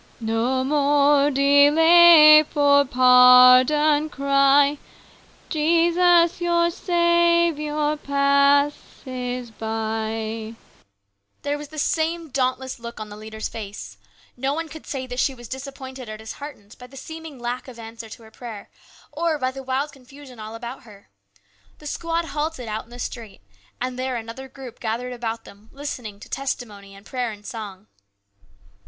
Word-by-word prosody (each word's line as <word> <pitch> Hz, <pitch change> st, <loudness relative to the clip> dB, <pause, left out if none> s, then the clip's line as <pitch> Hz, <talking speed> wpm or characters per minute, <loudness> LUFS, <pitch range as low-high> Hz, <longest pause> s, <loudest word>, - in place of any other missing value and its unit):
No 230 Hz, +3 st, -1 dB
more 285 Hz, 0 st, +3 dB
delay, 305 Hz, +3 st, +7 dB
for 285 Hz, -2 st, +3 dB
pardon 255 Hz, +4 st, +6 dB
cry; 280 Hz, +1 st, +3 dB, 0.7 s
Jesus, 340 Hz, +2 st, +2 dB
your 340 Hz, 0 st, +1 dB
Saviour, 340 Hz, -4 st, +1 dB
passes 280 Hz, -3 st, 0 dB
by. 220 Hz, 0 st, -4 dB, 0.9 s
There 290 Hz, 0 st, -1 dB
was 295 Hz, -, -8 dB
the 310 Hz, +2 st, -13 dB
same 325 Hz, +2 st, -1 dB
dauntless 260 Hz, -1 st, -2 dB
look 235 Hz, -1 st, -9 dB
on 215 Hz, -1 st, -7 dB
the 205 Hz, -, -10 dB
leader's 220 Hz, +1 st, -7 dB
face. 200 Hz, -, -9 dB, 0.4 s
No 270 Hz, +3 st, -2 dB
one 325 Hz, 0 st, -5 dB
could 315 Hz, 0 st, -12 dB
say 265 Hz, -2 st, -5 dB
that 250 Hz, 0 st, -6 dB
she 270 Hz, +1 st, 0 dB
was 240 Hz, -1 st, -12 dB
disappointed 265 Hz, -1 st, -9 dB
or 215 Hz, -, -7 dB
disheartened 220 Hz, -1 st, -11 dB
by 250 Hz, -, -11 dB
the 270 Hz, +2 st, -15 dB
seeming 320 Hz, 0 st, -9 dB
lack 245 Hz, +2 st, -5 dB
of 250 Hz, -2 st, -12 dB
answer 225 Hz, 0 st, -10 dB
to 225 Hz, -, -12 dB
her 220 Hz, -, -16 dB
prayer, 220 Hz, -4 st, -10 dB, 0.4 s
or 330 Hz, -2 st, -1 dB
by 255 Hz, -2 st, -2 dB
the 270 Hz, +1 st, -9 dB
wild 265 Hz, +3 st, -3 dB
confusion 270 Hz, -2 st, -15 dB
all 215 Hz, +1 st, -8 dB
about 240 Hz, +3 st, -8 dB
her. 210 Hz, -5 st, -18 dB, 0.7 s
The 300 Hz, -, -17 dB
squad 335 Hz, +2 st, -3 dB
halted 300 Hz, -5 st, -4 dB
out 215 Hz, +2 st, -5 dB
in -, -, -25 dB
the 240 Hz, -, -12 dB
street, 230 Hz, -, -8 dB, 0.4 s
and 255 Hz, 0 st, -4 dB
there 260 Hz, 0 st, -3 dB
another 230 Hz, +3 st, -7 dB
group 260 Hz, -2 st, -12 dB
gathered 240 Hz, +2 st, -4 dB
about 230 Hz, -2 st, -5 dB
them 205 Hz, +2 st, -17 dB
listening 245 Hz, -7 st, -7 dB
to -, -, -11 dB
testimony 210 Hz, -7 st, -6 dB
and 200 Hz, +1 st, -16 dB
prayer 250 Hz, -2 st, -3 dB
and 205 Hz, -1 st, -13 dB
song. 210 Hz, -5 st, -8 dB
265 Hz, 145 wpm, -22 LUFS, 230-295 Hz, 0.9 s, delay